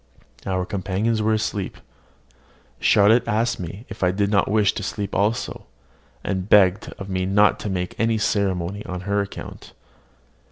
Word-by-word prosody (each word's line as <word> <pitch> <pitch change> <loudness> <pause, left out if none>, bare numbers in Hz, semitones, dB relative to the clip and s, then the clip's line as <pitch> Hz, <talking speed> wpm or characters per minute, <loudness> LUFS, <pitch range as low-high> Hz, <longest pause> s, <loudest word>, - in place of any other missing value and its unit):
Our 95 -1 0
companions 105 +2 -1
were 110 +1 +2
asleep. 105 -3 -3 1.0
Charlotte 110 +4 +4
asked 115 +2 0
me 95 +6 -7
if 110 - -10
I 90 - +4
did 100 +2 0
not 100 -2 +2
wish 105 -1 +3
to - - -5
sleep 100 -2 -4
also, 105 +4 -1 0.6
and 95 0 -3
begged 100 0 +4
of 100 - -7
me 95 -1 -1
not 105 +2 +4
to 105 - -4
make 90 -2 -2
any 115 0 +2
ceremony 100 -2 -1
on 90 -1 -5
her 100 +2 0
account. 100 - -8
100 Hz, 155 wpm, -23 LUFS, 95-105 Hz, 1.0 s, Charlotte